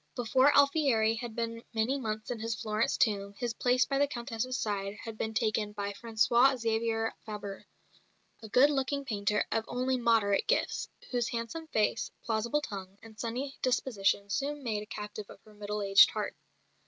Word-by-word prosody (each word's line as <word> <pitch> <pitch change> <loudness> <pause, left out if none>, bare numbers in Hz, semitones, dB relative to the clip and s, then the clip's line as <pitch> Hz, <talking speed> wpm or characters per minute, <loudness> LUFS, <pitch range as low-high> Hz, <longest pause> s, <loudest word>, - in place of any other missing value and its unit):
Before 255 +3 +4
Alfieri 280 -6 +4
had 230 -1 -6
been 230 -1 -3
many 240 +6 +1
months 215 -1 -4
in 240 - -4
his 225 +1 -2
Florence 215 +1 0
tomb 200 -2 +1
his 240 -2 -2
place 250 +1 +2
by 275 -1 -1
the 285 - +4
Countess's 240 0 -3
side 200 -2 -2
had 225 -1 -6
been 220 0 -3
taken 215 -1 0
by 200 -1 -3
François 235 +4 +3
Xavier 225 -1 0
Fabre, 205 -2 -7 0.7
a 220 - -9
good 265 +7 +5
looking 280 0 -1
painter 210 -3 0
of 225 - +1
only 255 +1 0
moderate 225 -4 +2
gifts, - - 0 0.2
whose 240 -2 0
handsome 235 +8 -4
face, 220 -4 0
plausible 235 +6 0
tongue, 195 -7 -7
and 220 -1 -14
sunny 250 +5 -3
disposition 220 -6 +1
soon 290 +5 -2
made 215 -4 -1
a 210 - -9
captive 210 -1 -7
of - - -12
her 215 - -17
middle 210 0 -4
aged 195 0 +7
heart. - - -3
225 Hz, 170 wpm, -30 LUFS, 210-250 Hz, 0.7 s, aged